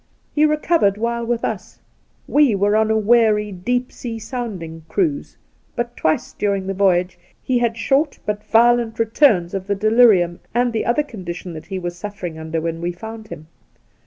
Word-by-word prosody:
He 305 Hz, +1 st, +4 dB
recovered 305 Hz, -, +2 dB
while 235 Hz, +1 st, -1 dB
with 240 Hz, -1 st, -1 dB
us 200 Hz, -4 st, -5 dB, 0.3 s
— -, -, -40 dB
we 285 Hz, -8 st, +5 dB
were 205 Hz, +2 st, +2 dB
on 220 Hz, 0 st, +3 dB
a 220 Hz, -, +2 dB
weary 215 Hz, -1 st, +3 dB
deep 245 Hz, +7 st, -2 dB
sea 230 Hz, -2 st, -6 dB
sounding 200 Hz, -9 st, -6 dB
cruise 315 Hz, -7 st, -1 dB, 0.2 s
— -, -, -40 dB
but 240 Hz, 0 st, -3 dB
twic& 155 Hz, -, -1 dB
during 200 Hz, -2 st, 0 dB
the 195 Hz, -, -2 dB
voyage 180 Hz, -2 st, +1 dB, 0.2 s
he 255 Hz, -2 st, 0 dB
had 235 Hz, -1 st, 0 dB
short 275 Hz, +5 st, +1 dB
but 210 Hz, 0 st, -2 dB
violent 235 Hz, 0 st, +3 dB
returns 220 Hz, -, +3 dB
of 190 Hz, -1 st, -4 dB
the 200 Hz, -, 0 dB
delirium 210 Hz, -5 st, +4 dB, 0.2 s
and 245 Hz, 0 st, +2 dB
the 220 Hz, -, -1 dB
other 240 Hz, +6 st, +2 dB
conditions 180 Hz, -8 st, -7 dB
tha,t 155 Hz, -, -9 dB
he 190 Hz, -, -4 dB
was 175 Hz, -1 st, -4 dB
suflfering 180 Hz, -3 st, -7 dB
under 160 Hz, +1 st, -3 dB
when 165 Hz, 0 st, -3 dB
we 175 Hz, +1 st, -1 dB
found 220 Hz, +4 st, -9 dB
him. 155 Hz, -, -9 dB
215 Hz, 185 wpm, -20 LUFS, 180-240 Hz, 0.3 s, we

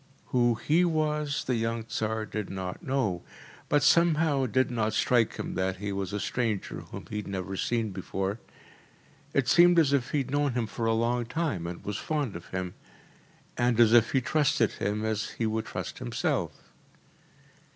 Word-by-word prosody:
Who 120 Hz, -2 st, +3 dB
HE 160 Hz, +9 st, +2 dB
was 150 Hz, -3 st, 0 dB
the 130 Hz, -, -1 dB
young 115 Hz, 0 st, -1 dB
Tsar 110 Hz, 0 st, -2 dB
did 105 Hz, -2 st, -4 dB
not 95 Hz, -, -5 dB
know, 130 Hz, -, -1 dB, 0.5 s
but 145 Hz, 0 st, +3 dB
somehow 155 Hz, -3 st, +4 dB
it 120 Hz, -, -5 dB
did 130 Hz, +2 st, +2 dB
not 110 Hz, -2 st, 0 dB
strike 120 Hz, -3 st, +2 dB
him -, -, -4 dB
that 95 Hz, 0 st, -1 dB
he 100 Hz, +1 st, -4 dB
was 95 Hz, -2 st, -3 dB
a 105 Hz, -, -2 dB
stranger 110 Hz, -2 st, -2 dB
whom -, -, -9 dB
he 105 Hz, -, -3 dB
had 105 Hz, -, -4 dB
never 95 Hz, 0 st, -4 dB
seen 115 Hz, +1 st, -1 dB
before. 95 Hz, +2 st, -3 dB, 1.0 s
It 135 Hz, -3 st, +2 dB
seemed 175 Hz, +4 st, +6 dB
as 150 Hz, -4 st, +4 dB
if 130 Hz, -4 st, +1 dB
he -, -, 0 dB
had 135 Hz, -2 st, -2 dB
known 145 Hz, -2 st, +1 dB
him 120 Hz, -2 st, 0 dB
for 115 Hz, +1 st, -3 dB
a 115 Hz, -, +3 dB
long 120 Hz, +1 st, 0 dB
time 120 Hz, -, -2 dB
and 85 Hz, 0 st, -7 dB
was 105 Hz, 0 st, -2 dB
fond 145 Hz, -, -2 dB
of 85 Hz, -, -8 dB
him, 90 Hz, -1 st, -4 dB, 0.9 s
and 120 Hz, -1 st, +2 dB
as 115 Hz, -1 st, +6 dB
if 120 Hz, -2 st, +5 dB
he 135 Hz, -, +3 dB
trusted 140 Hz, -4 st, +2 dB
him 105 Hz, +1 st, -2 dB
as 110 Hz, -1 st, -1 dB
he 115 Hz, -, 0 dB
would 110 Hz, 0 st, -1 dB
trust -, -, -5 dB
himself. -, -, -2 dB
115 Hz, 185 wpm, -28 LUFS, 105-140 Hz, 1.0 s, seemed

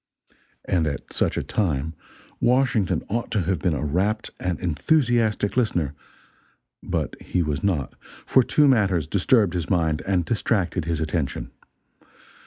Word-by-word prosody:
And 85 Hz, -4 st, +1 dB
at 70 Hz, -, -5 dB
such -, -, 0 dB
a -, -, -1 dB
time 80 Hz, -6 st, -1 dB, 0.5 s
Washington 125 Hz, -6 st, +2 dB
ought 115 Hz, +3 st, -2 dB
to 105 Hz, -, 0 dB
have 90 Hz, -1 st, -1 dB
been 85 Hz, -1 st, 0 dB
a 75 Hz, -, -2 dB
rapt 95 Hz, +9 st, 0 dB
and 90 Hz, -2 st, -2 dB
enthusiastic 110 Hz, -, +1 dB
listener, 90 Hz, -, 0 dB, 0.9 s
but -, -, -2 dB
he 90 Hz, -, -1 dB
was 75 Hz, -2 st, -2 dB
not, 85 Hz, -9 st, 0 dB, 0.3 s
for 130 Hz, -, +5 dB
two 145 Hz, +4 st, +3 dB
matters 100 Hz, -, +3 dB
disturbed 100 Hz, -, +2 dB
his 85 Hz, -2 st, -3 dB
mind 80 Hz, -4 st, +1 dB
and 90 Hz, -3 st, +1 dB
distracted 95 Hz, -6 st, 0 dB
his 85 Hz, -1 st, -1 dB
attention. 80 Hz, -3 st, -2 dB
90 Hz, 140 wpm, -24 LUFS, 80-110 Hz, 0.9 s, for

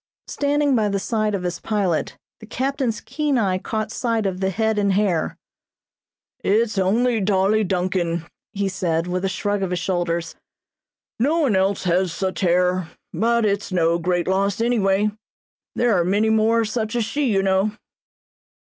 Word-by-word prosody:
Standing 285 Hz, -1 st, +1 dB
by 215 Hz, -3 st, +2 dB
the 200 Hz, -, 0 dB
side 215 Hz, +1 st, -1 dB
of 185 Hz, -, -4 dB
his 175 Hz, -1 st, -3 dB
pilot, 195 Hz, -7 st, -1 dB, 0.2 s
the 220 Hz, -, -12 dB
captain's 260 Hz, -1 st, -2 dB
keen 285 Hz, +3 st, -1 dB
eye 190 Hz, -5 st, +1 dB
caught 215 Hz, +1 st, -3 dB
sight 230 Hz, -3 st, -1 dB
of 185 Hz, -1 st, -2 dB
the 190 Hz, 0 st, 0 dB
head 220 Hz, +2 st, 0 dB
and 200 Hz, -1 st, +2 dB
hair. 185 Hz, -5 st, 0 dB, 1.0 s
"It's 215 Hz, +1 st, +1 dB
only 225 Hz, +5 st, +2 dB
Dolly 200 Hz, +2 st, +2 dB
Duncan," 180 Hz, -3 st, -1 dB, 0.3 s
he 200 Hz, -1 st, -1 dB
said, 175 Hz, -3 st, -1 dB
with 180 Hz, +1 st, -2 dB
a 195 Hz, -, +1 dB
shrug 205 Hz, +1 st, -1 dB
of 190 Hz, -, -1 dB
his 180 Hz, -, -1 dB
shoulders. 175 Hz, -1 st, -2 dB, 0.9 s
"No 290 Hz, +8 st, +2 dB
one 260 Hz, -9 st, +2 dB
else 190 Hz, +1 st, +1 dB
has 180 Hz, 0 st, +1 dB
such 190 Hz, +3 st, -3 dB
hair; 180 Hz, -1 st, +2 dB, 0.2 s
but 235 Hz, 0 st, +2 dB
it's 200 Hz, -1 st, -1 dB
no 170 Hz, -1 st, +2 dB
great 175 Hz, 0 st, 0 dB
loss 195 Hz, +1 st, +1 dB
anyway; 210 Hz, -3 st, +2 dB, 0.6 s
there 240 Hz, -3 st, +2 dB
are 175 Hz, -, +3 dB
many 205 Hz, +5 st, +2 dB
more 220 Hz, +1 st, +3 dB
of 220 Hz, -, -2 dB
such 220 Hz, 0 st, -2 dB
as 235 Hz, -2 st, +1 dB
she, 290 Hz, +6 st, -1 dB
you 195 Hz, -1 st, +2 dB
know." 195 Hz, +2 st, +1 dB
200 Hz, 165 wpm, -22 LUFS, 185-220 Hz, 1.0 s, are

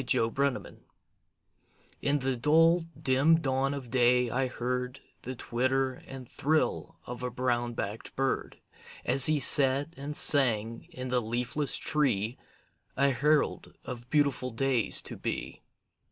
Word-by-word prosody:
THE 125 Hz, 0 st, +1 dB
UNDER 115 Hz, 0 st, 0 dB, 0.3 s
TONE -, -, -14 dB, 1.2 s
In 145 Hz, +1 st, +1 dB
the 135 Hz, -1 st, -1 dB
dull, 165 Hz, +6 st, +3 dB
dim 140 Hz, +5 st, +3 dB
dawn 135 Hz, -1 st, -1 dB
of 130 Hz, -4 st, -8 dB
day 125 Hz, -1 st, +3 dB
I 130 Hz, +2 st, 0 dB
heard 125 Hz, +1 st, -4 dB, 0.2 s
The 130 Hz, +1 st, -6 dB
twitter 130 Hz, +2 st, -1 dB
and 130 Hz, -2 st, -9 dB
thrill 160 Hz, +3 st, -1 dB
of 125 Hz, 0 st, -7 dB
a 125 Hz, -, -2 dB
brown 120 Hz, -1 st, -1 dB
backed 105 Hz, +1 st, -5 dB
bird, 135 Hz, 0 st, -2 dB, 0.5 s
As 135 Hz, -, +5 dB
he 155 Hz, -1 st, +2 dB
sat 140 Hz, +3 st, +3 dB
and 145 Hz, +1 st, -6 dB
sang 115 Hz, -6 st, +2 dB
in 130 Hz, 0 st, -7 dB
the 125 Hz, 0 st, +1 dB
leafless 120 Hz, +6 st, 0 dB
tree, 125 Hz, -6 st, 0 dB, 0.6 s
A 140 Hz, 0 st, +3 dB
herald 150 Hz, +4 st, 0 dB
of 125 Hz, -1 st, -8 dB
beautiful 140 Hz, -4 st, +1 dB
days 125 Hz, -1 st, -1 dB
to -, -, -6 dB
be. -, -, -5 dB
130 Hz, 140 wpm, -29 LUFS, 125-140 Hz, 1.2 s, As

